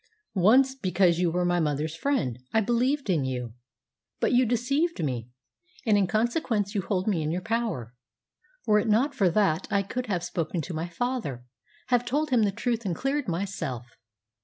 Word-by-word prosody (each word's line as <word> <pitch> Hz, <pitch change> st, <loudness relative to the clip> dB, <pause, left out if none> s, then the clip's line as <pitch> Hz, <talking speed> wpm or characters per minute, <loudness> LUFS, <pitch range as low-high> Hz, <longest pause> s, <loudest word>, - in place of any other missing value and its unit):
"Once, 250 Hz, +8 st, +5 dB
because 185 Hz, -7 st, +2 dB
you 180 Hz, -1 st, +2 dB
were 180 Hz, +2 st, 0 dB
my 175 Hz, 0 st, +2 dB
mother's 150 Hz, 0 st, -1 dB
friend, 165 Hz, -, -1 dB
I 220 Hz, -, +3 dB
believed 250 Hz, +5 st, +1 dB
in 170 Hz, -7 st, +2 dB
you. 125 Hz, -3 st, -3 dB, 0.7 s
But -, -, +1 dB
you 250 Hz, 0 st, +4 dB
deceived 275 Hz, -, 0 dB
me, 125 Hz, -5 st, -3 dB, 0.6 s
and 215 Hz, -3 st, +4 dB
in 200 Hz, -2 st, +3 dB
consequence 220 Hz, -, 0 dB
you 205 Hz, -, 0 dB
hold 185 Hz, +1 st, -2 dB
me 190 Hz, -6 st, +1 dB
in 155 Hz, -, -1 dB
your 175 Hz, +3 st, -2 dB
power. 220 Hz, -, -2 dB, 0.7 s
Were 210 Hz, -2 st, +4 dB
it 210 Hz, -, -1 dB
not 240 Hz, +7 st, +3 dB
for 200 Hz, -9 st, +3 dB
that 180 Hz, -2 st, +1 dB
I 200 Hz, -1 st, +2 dB
could 250 Hz, +6 st, -4 dB
have 180 Hz, -5 st, -1 dB
spoken 175 Hz, -1 st, -2 dB
to 175 Hz, -, -6 dB
my 160 Hz, +2 st, -3 dB
father 170 Hz, -, -3 dB, 0.4 s
have 245 Hz, -1 st, +3 dB
told 290 Hz, +5 st, -1 dB
him 245 Hz, -3 st, +4 dB
the 205 Hz, -2 st, +2 dB
truth 235 Hz, +3 st, -2 dB
and 185 Hz, -5 st, -2 dB
cleared 275 Hz, -, -1 dB
myself. 170 Hz, -, -3 dB
200 Hz, 185 wpm, -27 LUFS, 170-245 Hz, 0.7 s, Once